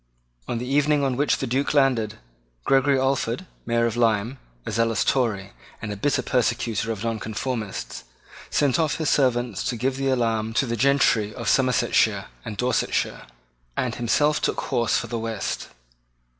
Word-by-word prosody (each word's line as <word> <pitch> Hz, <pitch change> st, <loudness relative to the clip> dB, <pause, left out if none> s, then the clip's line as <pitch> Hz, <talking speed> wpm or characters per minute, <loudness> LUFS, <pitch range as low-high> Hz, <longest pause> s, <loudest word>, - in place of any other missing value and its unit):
On 120 Hz, -, -2 dB
the 120 Hz, -, -4 dB
evening 145 Hz, +2 st, +2 dB
on 135 Hz, -2 st, +1 dB
which 145 Hz, +2 st, +2 dB
the -, -, -3 dB
Duke 135 Hz, +4 st, 0 dB
landed, 125 Hz, -7 st, +2 dB, 0.5 s
Gregory 135 Hz, +1 st, +4 dB
Alford, 130 Hz, +2 st, 0 dB, 0.2 s
Mayor 115 Hz, 0 st, +2 dB
of 115 Hz, -1 st, -1 dB
Lyme, 115 Hz, +2 st, +1 dB, 0.3 s
a -, -, -4 dB
zealous 115 Hz, -1 st, +1 dB
Tory, 105 Hz, -7 st, 0 dB, 0.3 s
and 105 Hz, -, -5 dB
a -, -, -6 dB
bitter 140 Hz, +8 st, 0 dB
persecutor 115 Hz, -3 st, 0 dB
of 110 Hz, -2 st, -5 dB
Nonconformists, 110 Hz, -1 st, -4 dB, 0.4 s
sent 145 Hz, +1 st, +2 dB
off 155 Hz, -3 st, +1 dB
his 160 Hz, -, 0 dB
servants 120 Hz, -6 st, +1 dB
to 125 Hz, -, -1 dB
give 130 Hz, +3 st, -1 dB
the 135 Hz, 0 st, 0 dB
alarm 115 Hz, -3 st, 0 dB
to 135 Hz, -, +2 dB
the 120 Hz, -1 st, -2 dB
gentry 120 Hz, -4 st, +2 dB
of 120 Hz, -2 st, -6 dB
Somersetshire 130 Hz, -3 st, +2 dB, 0.2 s
and 105 Hz, -, -6 dB
Dorsetshire, 125 Hz, -, -1 dB, 0.5 s
and 125 Hz, -3 st, 0 dB
himself 145 Hz, +7 st, +1 dB
took -, -, 0 dB
horse 120 Hz, -3 st, +1 dB
for -, -, -2 dB
the 115 Hz, 0 st, -4 dB
West. 110 Hz, -2 st, -3 dB
120 Hz, 160 wpm, -24 LUFS, 115-135 Hz, 0.5 s, Gregory